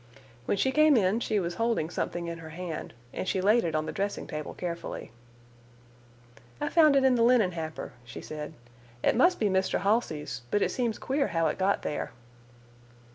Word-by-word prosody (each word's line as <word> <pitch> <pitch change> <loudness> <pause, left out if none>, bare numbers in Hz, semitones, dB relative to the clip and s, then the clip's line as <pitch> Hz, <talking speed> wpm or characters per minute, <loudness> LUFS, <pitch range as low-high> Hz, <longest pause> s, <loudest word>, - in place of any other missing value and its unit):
When - - 0
she 265 - +2
came 305 -1 +5
in 200 +1 +2
she 215 -3 0
was 175 -2 -2
holding 225 -9 +1
something 175 -1 -3
in 170 0 -5
her 160 -1 -9
hand, 165 -5 -6 0.2
and - - -4
she 190 - +1
laid 210 +5 +4
it 165 -2 -1
on 155 0 0
the - - -3
dressing 200 +1 -2
table 150 -1 -6
carefully. 170 -8 -5 1.5
"I - - -1
found 310 -4 +5
it 275 - +4
in 265 -1 +5
the 240 - +2
linen 230 -5 +4
hamper," 160 -4 -6
she 115 -1 -9
said. 150 0 -7 0.5
"It - - +3
must 355 +9 +4
be 220 - +1
Mr. 190 -1 +1
Halsey's, 195 - 0
but 205 - +2
it - - 0
seems 235 -4 -1
queer 275 +1 0
how 165 -1 0
it - - -4
got 195 +1 +1
there." 145 - -3
190 Hz, 190 wpm, -28 LUFS, 165-235 Hz, 1.5 s, came